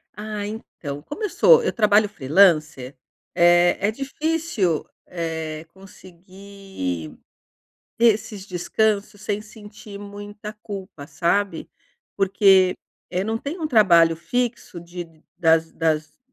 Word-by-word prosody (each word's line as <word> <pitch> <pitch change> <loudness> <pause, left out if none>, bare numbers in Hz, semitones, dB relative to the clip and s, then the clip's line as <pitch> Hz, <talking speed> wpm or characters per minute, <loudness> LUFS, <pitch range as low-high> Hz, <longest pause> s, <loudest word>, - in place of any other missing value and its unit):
Ah, 210 0 -5
então, 150 -9 -7
como 405 - -7
eu 420 - 0
sou 470 +6 +5
eu - - 0
trabalho 210 -2 +3
freelancer, 155 -5 +2 0.4
eh, 175 0 +4
é 205 +2 +1
difícil, 275 - -2 0.2
eh, 160 -2 -5
conseguir 190 - -8 0.8
ter 230 -2 +5
esses 210 -2 -8
descansos 205 +3 -1
sem 210 0 -3
sentir 210 -2 -12
muita 205 +1 -9
culpa, 195 -8 -9
sabe. 175 +7 -1 0.5
Porque, 195 -1 +4 0.4
eh, 180 - -1
não 220 +2 -2
tem 290 +9 -6
um 310 - -2
trabalho 170 - +5
fixo 235 -1 -3
de 170 -2 -10
das 160 -1 +2
das 155 -2 -1
195 Hz, 115 wpm, -22 LUFS, 165-215 Hz, 0.8 s, sou